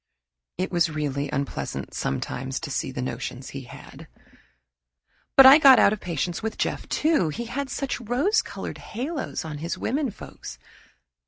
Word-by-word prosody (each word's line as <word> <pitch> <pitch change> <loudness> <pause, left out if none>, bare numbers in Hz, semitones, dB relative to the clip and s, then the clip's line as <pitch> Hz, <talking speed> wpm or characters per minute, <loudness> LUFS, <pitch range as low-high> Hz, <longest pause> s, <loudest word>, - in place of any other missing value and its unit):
It 185 +1 -2
was 170 -2 +2
really 145 -2 -2
unpleasant 140 0 -4
sometimes 130 - -3
to 145 - -5
see - - -2
the 125 - -4
notions 130 +1 -5
he 135 -2 -7
had. - - -12 1.3
But 270 - +10
I 270 +3 +10
got 270 -4 +8
out 200 - +5
of 215 - -4
patience 170 -1 -3
with 220 0 -4
Jeff, - - -2
too. 305 - +2
He 235 +11 -4
had 265 +4 -4
such 270 -2 -3
rose 275 - +2
colored - - -7
halos 270 - -4
on 150 -2 -6
his 165 +3 -3
womenfolks. 270 -4 -4
180 Hz, 155 wpm, -25 LUFS, -, 1.3 s, But